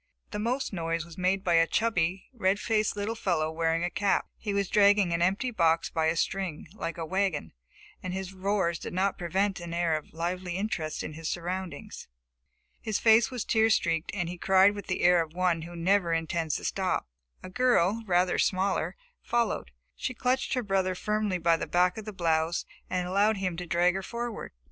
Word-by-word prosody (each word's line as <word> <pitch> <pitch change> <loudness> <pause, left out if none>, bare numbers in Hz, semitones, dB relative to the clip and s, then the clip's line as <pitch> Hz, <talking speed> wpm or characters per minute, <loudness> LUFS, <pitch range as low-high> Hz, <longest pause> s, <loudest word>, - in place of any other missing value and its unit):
The 210 - -3
most 245 +3 -1
noise 165 -2 -2
was 170 -1 -12
made 190 +1 0
by 175 -4 +2
a 165 0 +5
chubby, 185 -5 0
red 200 -4 +1
faced 215 -2 +1
little 205 +2 -2
fellow 170 -8 0
wearing 165 +1 0
a 175 - -1
cap. 200 -1 +1
He 210 - -4
was 200 -1 0
dragging 200 -3 +4
an 170 - 0
empty 195 +8 +1
box 165 -6 +2
by 160 -1 +1
a 160 - +1
string, 180 -2 -2
like 170 -6 -5
a - - -5
little 160 - -5
wagon, 190 -5 0 0.5
and 185 - -4
his 190 0 -5
roars 190 -3 0
did - - -7
not 190 +2 0
prevent 190 +3 0
an 170 -1 -6
air 170 -2 +1
of 155 - -6
lively 175 +2 -3
interest 175 -7 -3
in - - -6
his 160 +1 -5
surroundings. 180 +1 -5 0.7
His 215 -2 -1
face 225 0 +5
was 250 -4 -4
tear 220 0 +3
streaked, 165 -6 +1
and 175 -4 -1
he 175 0 -6
cried 190 +2 +5
with 205 -1 -8
the - - -1
air 175 -1 +5
of 160 -1 -5
one 180 -2 +1
who 170 +2 -8
never 175 0 +2
intends 165 -1 -1
to - - -4
stop. 190 - -1 0.4
A - - -7
girl, 230 -3 +2
rather 180 0 +2
smaller, 190 +1 +1 0.3
followed. 235 - -1 0.3
She 255 - -4
clutched 255 +2 0
her 250 - -1
brother 190 -2 0
firmly 210 -1 -1
by 170 -1 +3
the - - -4
back 180 +3 +2
of 215 - -9
the 215 - -5
blouse 165 -2 0 0.2
and 180 -1 -1
allowed 200 +3 +2
him 185 -3 -2
to 180 0 -5
drag 175 +2 +3
her 195 - -3
forward. 235 +2 -5
185 Hz, 200 wpm, -28 LUFS, 170-205 Hz, 0.7 s, a